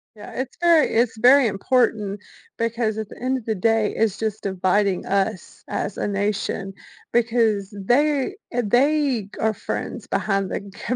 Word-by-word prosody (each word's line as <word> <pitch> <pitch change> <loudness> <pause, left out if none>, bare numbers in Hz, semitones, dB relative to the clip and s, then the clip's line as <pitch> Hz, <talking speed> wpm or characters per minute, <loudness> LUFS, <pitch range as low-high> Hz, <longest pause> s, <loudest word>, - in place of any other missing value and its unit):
Yeah. 210 - -11
It's 260 0 -5
very 335 -3 +5
it's 230 -1 +2
very 255 +3 +6
important 210 -1 0 0.4
because, 230 -1 -1
at 220 -2 -4
the - - -13
end 260 +1 0
of 235 - -9
the 220 - 0
day, 220 +2 +1
it's 215 -2 +1
just 220 -1 -3
dividing 190 0 +1
us 195 0 -2
as 200 - -3
a - - -1
nation 200 -1 -2 0.4
because 225 -4 +1
they 280 - +1 0.2
eh, 245 - +1
they 260 -1 +2
are 220 0 +2
friends - - -5
behind 195 -2 -1
the 200 +5 -4
220 Hz, 155 wpm, -22 LUFS, 200-245 Hz, 0.4 s, very